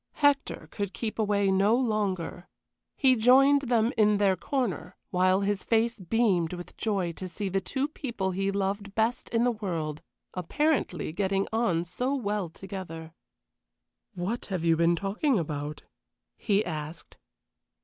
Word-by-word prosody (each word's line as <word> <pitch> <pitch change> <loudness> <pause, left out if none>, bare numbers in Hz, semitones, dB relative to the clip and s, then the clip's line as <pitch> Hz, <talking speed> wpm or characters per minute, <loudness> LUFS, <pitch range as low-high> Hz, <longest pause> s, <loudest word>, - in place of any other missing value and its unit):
Hector 285 -1 +1
could 200 -2 -4
keep 225 -1 -4
away 200 -2 +2
no 200 +4 +4
longer. 205 -8 -1 0.5
He 260 -3 +5
joined 265 +3 +5
them 235 +1 +3
in 210 -1 +4
their 200 -2 +3
corner, 245 - -2 0.2
while 185 +1 +3
his 200 -1 0
face 230 0 +1
beamed 185 -3 +1
with 175 0 -8
joy 195 -6 -1
to 185 +3 -7
see 195 +3 -3
the 195 +1 0
two 265 +8 -1
people 235 -11 -3
he 195 +2 -1
loved 200 +1 -2
best 225 +2 0
in 230 0 +1
the 245 - +3
world 165 -8 -3 0.3
apparently 195 - 0
getting 195 +1 0
on 180 -7 +1
so 250 +10 -2
well 205 -7 -2
together. 165 -3 -8 1.0
"What 190 +7 -3
have 185 -4 -3
you 165 -1 +5
been 170 +1 +3
talking 210 - 0
about?" 150 -3 -4 0.5
he 210 -1 +1
asked. 155 -1 -6
200 Hz, 145 wpm, -28 LUFS, 180-230 Hz, 1.0 s, He